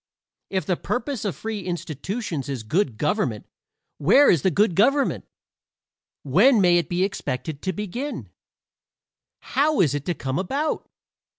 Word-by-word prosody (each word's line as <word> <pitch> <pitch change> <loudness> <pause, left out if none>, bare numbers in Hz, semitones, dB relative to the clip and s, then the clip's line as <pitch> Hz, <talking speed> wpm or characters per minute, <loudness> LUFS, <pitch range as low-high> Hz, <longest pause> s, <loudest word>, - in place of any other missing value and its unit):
If 190 -1 -1
the 180 -3 0
purpose 250 -1 -3
of 195 - -2
free 220 -2 -4
institutions 175 - -4
is 130 -5 -4
good 135 - 0
government 135 - -1 0.5
where 210 - +6
is 165 - +2
the 190 - +3
good 200 +2 +2
government? 275 - +2 1.0
when 210 - +5
may 175 -2 +5
it 170 - -4
be 180 +1 +1
expected 140 -6 -3
to 190 - -1
begin? 210 - -5 1.1
how 290 +3 +1
is 150 -7 +3
it 145 0 -3
to 175 - -1
come 135 +2 -3
about? 280 - -2
185 Hz, 140 wpm, -24 LUFS, 150-225 Hz, 1.1 s, where